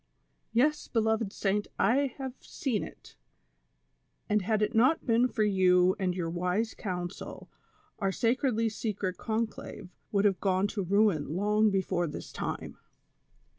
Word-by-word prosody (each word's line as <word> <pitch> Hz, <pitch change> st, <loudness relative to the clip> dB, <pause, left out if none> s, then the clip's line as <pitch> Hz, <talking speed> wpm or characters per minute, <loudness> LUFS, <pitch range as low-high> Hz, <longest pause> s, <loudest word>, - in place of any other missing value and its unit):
"Yes, 295 Hz, +7 st, +2 dB
beloved 220 Hz, -2 st, +1 dB
saint, 205 Hz, 0 st, -1 dB
I 260 Hz, +5 st, +2 dB
have 265 Hz, -2 st, -5 dB
seen 250 Hz, -7 st, -2 dB
it, -, -, -12 dB, 1.1 s
and 210 Hz, -1 st, +2 dB
had 215 Hz, +2 st, +1 dB
it 210 Hz, -, 0 dB
not 255 Hz, +8 st, +3 dB
been 235 Hz, +1 st, +3 dB
for 220 Hz, -3 st, 0 dB
you 185 Hz, -2 st, +4 dB
and 185 Hz, -2 st, 0 dB
your 175 Hz, -3 st, -2 dB
wise 180 Hz, +6 st, -1 dB
coiuisel 180 Hz, -3 st, -6 dB, 0.5 s
our 195 Hz, -2 st, +1 dB
sacredly 230 Hz, +2 st, +1 dB
secret 205 Hz, -4 st, -3 dB
conclave 220 Hz, -3 st, -4 dB, 0.2 s
would 200 Hz, 0 st, +2 dB
have 195 Hz, -3 st, +3 dB
gone 190 Hz, -1 st, +2 dB
to 200 Hz, -, -3 dB
ruin 190 Hz, -5 st, +2 dB
long 210 Hz, +3 st, +3 dB
before 185 Hz, -3 st, 0 dB
this 150 Hz, -, -7 dB
time. -, -, -5 dB
210 Hz, 135 wpm, -29 LUFS, 185-225 Hz, 1.1 s, you